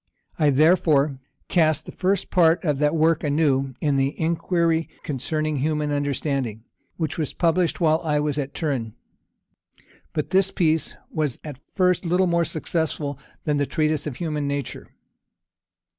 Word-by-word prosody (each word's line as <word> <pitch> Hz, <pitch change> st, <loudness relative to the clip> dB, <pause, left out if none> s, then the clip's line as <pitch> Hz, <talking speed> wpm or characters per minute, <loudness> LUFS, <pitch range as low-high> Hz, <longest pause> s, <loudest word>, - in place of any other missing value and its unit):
I, 150 Hz, -, +4 dB
therefore, 150 Hz, -2 st, +3 dB, 0.3 s
cast 155 Hz, -3 st, +2 dB
the -, -, -8 dB
first 195 Hz, +1 st, -1 dB
part 170 Hz, -2 st, +4 dB
of 150 Hz, -5 st, 0 dB
that 150 Hz, +1 st, +2 dB
work 160 Hz, 0 st, +2 dB
anew 140 Hz, -3 st, +1 dB
in 145 Hz, -2 st, +1 dB
the 135 Hz, +1 st, 0 dB
Inquiry 165 Hz, 0 st, +1 dB
concerning 155 Hz, +2 st, -2 dB
Human 150 Hz, +1 st, 0 dB
Understanding, 140 Hz, -5 st, -2 dB, 0.3 s
which 160 Hz, -1 st, -2 dB
was 155 Hz, -, -3 dB
published 170 Hz, 0 st, +1 dB
while 160 Hz, -2 st, +3 dB
I 150 Hz, -2 st, +1 dB
was 150 Hz, 0 st, -1 dB
at 140 Hz, -1 st, -4 dB
Turin. 130 Hz, -8 st, -2 dB, 1.2 s
But 150 Hz, -, -3 dB
this 195 Hz, 0 st, +3 dB
piece 160 Hz, -4 st, 0 dB, 0.2 s
was 150 Hz, -6 st, -1 dB
at 145 Hz, -4 st, -8 dB, 0.2 s
first 180 Hz, -1 st, +2 dB
little 180 Hz, +2 st, +2 dB
more 170 Hz, -1 st, +2 dB
successful 155 Hz, -3 st, -2 dB, 0.2 s
than 150 Hz, -2 st, 0 dB
the 145 Hz, -1 st, 0 dB
Treatise 155 Hz, -2 st, 0 dB
on 140 Hz, -, -4 dB
Human 150 Hz, -3 st, -2 dB
Nature. 140 Hz, -2 st, -4 dB
155 Hz, 145 wpm, -23 LUFS, 145-165 Hz, 1.2 s, I